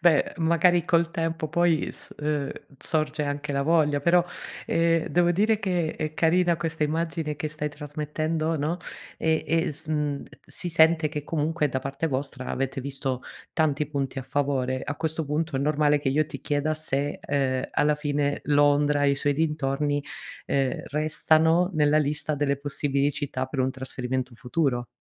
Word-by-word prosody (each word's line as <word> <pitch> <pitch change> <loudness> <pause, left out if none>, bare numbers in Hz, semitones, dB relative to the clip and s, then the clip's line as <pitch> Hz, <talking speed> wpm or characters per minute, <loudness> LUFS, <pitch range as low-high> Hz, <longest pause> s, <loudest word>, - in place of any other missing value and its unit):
Beh, 165 -4 +4
magari, 170 +1 +3
col 170 -1 +2
tempo, 165 -1 -2
poi, 170 -1 +2
s - - -9
uhm, 150 -2 -1 0.3
sorge 155 0 +1
anche 145 0 -3
la 140 0 +1
voglia, 150 -2 +3
però, 170 +3 +4 0.4
ehm, 165 -1 +2
devo 175 0 +3
dire 210 +5 +2
che 180 -5 -1
è 155 -1 -3
carina 170 +1 +3
questa 160 -1 -1
immagine 160 -1 -2
che 155 - -3
stai 150 0 -3
trasmettendo, 155 +2 -2
no, 155 +5 -1 0.4
ehm, 160 -1 +1
e 165 +2 +1
sn 150 -1 -2 0.2
si 175 - -2
sente, 160 -1 +4
che, 150 -1 -4
comunque, 155 0 0
da 130 - -1
parte 135 +4 -3
vostra, 135 -2 -3
avete 135 0 -2
visto 135 -1 -3 0.3
tanti 150 -2 +1
punti 140 -2 -3
a - - -4
favore. 130 -1 -1
A 145 - -3
questo 160 0 -2
punto, 150 0 -1
è - - 0
normale 150 +1 +3
che 145 - -1
io 150 +3 +2
ti - - -8
chieda, 145 +1 0
se, 145 -2 -2
uhm, 130 -2 0
alla 150 0 +3
fine, 145 -1 -1
Londra 145 0 +3
e 140 - +5
i - - +2
suoi 145 +1 0
dintorni, 145 -2 0 0.4
uhm, 135 -2 0
restano 160 +3 +3
nella 150 0 +4
lista 150 +1 0
delle 140 -1 0
possibili 140 0 0
città 140 -3 -3
per 130 +1 -3
un 130 +1 +2
trasferimento 130 -1 -4
futuro. 125 -1 -1
150 Hz, 165 wpm, -26 LUFS, 140-160 Hz, 0.4 s, e